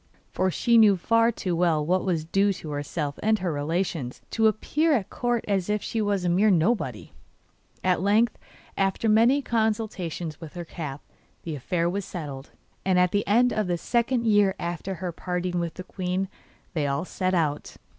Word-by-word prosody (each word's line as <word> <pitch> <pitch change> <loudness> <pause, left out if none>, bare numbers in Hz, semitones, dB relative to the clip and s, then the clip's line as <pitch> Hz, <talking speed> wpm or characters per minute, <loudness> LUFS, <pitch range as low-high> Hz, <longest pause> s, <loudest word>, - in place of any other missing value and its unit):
For 185 - +1
she 235 +5 +3
knew 205 -3 +6
far 230 +5 +3
too 185 -5 -2
well 165 -3 +2
what 180 +3 +1
was 170 -5 -1
due 195 +4 +2
to 165 -5 -8
herself 145 0 -3
and 220 +1 +3
her 180 -4 -2
relations, 150 -3 -2
to 225 -1 +3
appear 300 +9 +1
at 220 -9 -1
Court 240 -2 -1
as 195 -2 0
if 210 0 0
she 225 - -2
was 200 -3 0
a - - +2
mere 195 +5 +4
nobody. 200 +5 0 0.7
At 180 -2 +2
length, 215 +4 +3 0.4
after 195 +3 0
many 235 +6 +4
consultations 210 - -2
with 160 0 -9
her 175 -1 -5
cap, 150 -4 -6 0.4
the 165 - -4
affair 165 +5 -1
was 195 +3 -2
settled, 145 -7 -7 0.3
and 190 -1 +2
at 180 -1 +4
the 205 - 0
end 245 +4 +4
of 215 -3 0
the 175 -1 0
second 235 +5 0
year 205 -3 +4
after 175 +3 -4
her 180 -1 -4
parting 180 +1 -2
with 170 -1 -3
the 185 - -7
queen 185 0 -3 0.4
they 150 -4 0
all 140 +5 -1
set 185 0 -1
out. 150 -4 -1
185 Hz, 185 wpm, -26 LUFS, 170-215 Hz, 0.7 s, knew